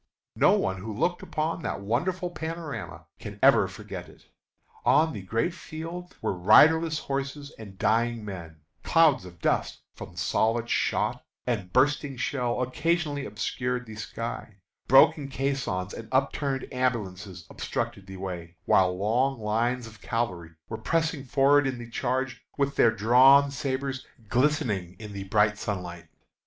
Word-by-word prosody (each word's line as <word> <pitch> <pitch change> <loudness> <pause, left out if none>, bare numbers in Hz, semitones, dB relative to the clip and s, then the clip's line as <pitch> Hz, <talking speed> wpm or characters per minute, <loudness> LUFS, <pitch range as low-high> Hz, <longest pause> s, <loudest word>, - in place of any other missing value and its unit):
No - - +5
one 95 0 0
who 110 +3 -5
looked 175 +7 0
upon 160 +1 -2
that - - -3
wonderful 175 - -1
panorama 160 - -6
can - - -8
ever - - +6
forget - - -8
it. - - -19 0.6
On 160 0 +4
the 100 - -6
great 115 - -1
field 170 +1 -8
were - - 0
riderless 155 - +5
horses 140 +1 -4
and 100 -3 -10
dying 115 +1 +1
men; 85 -6 -8 0.2
clouds 160 - +4
of 85 -1 -12
dust - - 0
from - - -10
solid 115 +1 0
shot - - 0 0.2
and 105 -7 -2
bursting 135 +2 +2
shell 125 -1 -1
occasionally 145 +1 -1
obscured 125 +4 -3
the 110 - -10
sky; 110 0 -6 0.3
broken 135 +2 +6
caissons 135 -9 -2
and 115 - -8
upturned 135 0 0
ambulances 100 -8 -2
obstructed 100 -1 -4
the 95 0 -8
way, 90 -3 -6
while 90 -1 +3
long 120 +6 +1
lines 115 +3 0
of 110 -2 -13
cavalry 90 -9 -3
were 110 - -5
pressing 160 +2 -1
forward 140 +1 +4
in 130 -2 -2
the 120 -1 -8
charge, 130 +1 -2
with 140 -1 0
their 115 - +5
drawn 130 +6 +6
sabres, 135 -1 -3 0.2
glistening 120 - 0
in 105 -1 -9
the 100 -1 -6
bright 105 +1 +2
sunlight. 90 -5 -5
125 Hz, 145 wpm, -27 LUFS, 105-140 Hz, 0.6 s, ever